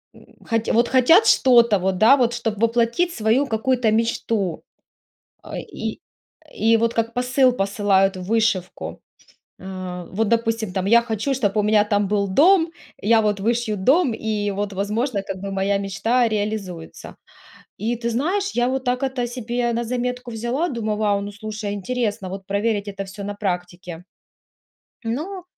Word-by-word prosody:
м, - - -17 0.2
хот 225 -1 0
вот 235 +1 +3
хотят 295 - +5
что-то 235 - +5
вот, 185 0 -1
да, 220 +7 +7
вот 240 -2 +1
чтоб 225 -3 -3
воплотить 235 +9 +1
свою 230 +4 +1
какую-то 235 0 +1
мечту, 220 -5 -1 0.8
э, - - -6
и - - -6 0.6
и 225 +1 +5
вот 230 +1 +1
как 230 0 -1
посыл 250 +1 +2
посылают 195 -2 +1
в - - -6
вышивку. 215 -3 -1 0.6
А, 185 -2 -6
вот 215 +3 0
допустим 225 -3 0
там 190 0 -2
я 235 +3 +5
хочу 235 +4 -2
чтоб 215 -6 -1
у 210 - +3
меня 210 0 +3
там 205 -2 0
был 200 -1 0
дом 330 - +4 0.3
я 225 +2 +4
вот 205 -2 0
вышью 225 0 0
дом 265 - +3
и 210 -2 -2
вот, 205 +1 -3
возможно, 210 +3 -1
как 195 - -6
бы 195 +1 -6
моя 195 +1 0
мечта 225 +5 +1
реализуется. 205 -6 -5 0.6
И 230 +3 -1
ты 235 0 -2
знаешь, 375 - -1
я 240 0 +2
вот 265 0 -2
так 250 +1 0
это 260 -2 -1
себе 240 0 -2
на 235 +1 -1
заметку 250 +1 -3
взяла, 240 +9 -2
думаю: 220 -4 -2
вау, 205 -2 +1
ну, 200 0 -6
слушай, 215 0 -5
интересно 205 -2 -3
вот 195 0 -7
проверить 205 +1 -1
это 195 -1 -5
всё 200 +1 -9
на 205 +1 -4
практике. 180 -3 -5 1.0
Ну, 335 +11 -4
220 Hz, 160 wpm, -22 LUFS, 200-240 Hz, 1.0 s, да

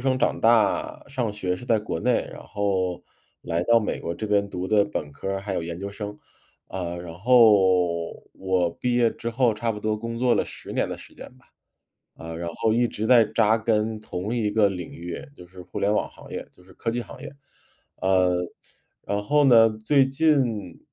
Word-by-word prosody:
生、 130 0 +1
长 - - 0
大、 110 -3 +2
上 125 -6 -2
学 90 -3 -2
是 125 - -10
在 115 -3 +2
国 105 -6 -4
内， - - +1
然 - - -10
后 95 -3 -1 0.4
来 85 0 -1
到 115 +5 +5
美 110 - -3
国 85 - -3
这 110 - -5
边 100 -1 +1
读 90 +1 -4
的 105 0 +4
本 75 -8 -5
科 75 +7 -5
儿， 95 0 -2
还 100 -1 -4
有 - - -1
研 85 0 -5
究 100 +2 -5
生。 105 0 -7 0.5
呃， 85 -2 -4
然 85 -2 -8
后 95 -6 +4
我 95 -2 0
毕 125 -1 0
业 120 -1 +4
之 115 - -5
后 120 -1 +2
差 115 +2 -2
不 105 - -4
多 110 0 -1
工 115 +2 -5
作 125 -1 +3
了 - - +1
10 - - -9
年 - - 0
的 - - -5
时 - - -14
间 - - -10
吧， 120 - -26 0.7
呃， 80 0 -8
然 85 0 -4
后 110 - +1
一 120 +2 +3
直 110 -1 -4
在 120 -3 +7
扎 110 +1 +2
根 110 -1 0
同 100 +1 -4
一 115 -4 0
个 105 -1 +4
领 90 -4 -6
域， 85 0 -6 0.2
就 90 - -12
是 90 +1 -15
互 - - -7
联 100 - +2
网 - - 0
行 - - -14
业， - - -6
就 90 - -21
是 95 - -18
科 115 - -3
技 120 +1 -2
行 - - -11
业。 - - -7 0.7
呃， 95 -1 +3 0.7
然 100 0 -1
后 150 +7 +3
呢， 115 -4 +7 0.2
最 135 +2 +4
近 130 - +1
105 Hz, 225 characters per minute, -24 LUFS, 90-115 Hz, 0.7 s, 在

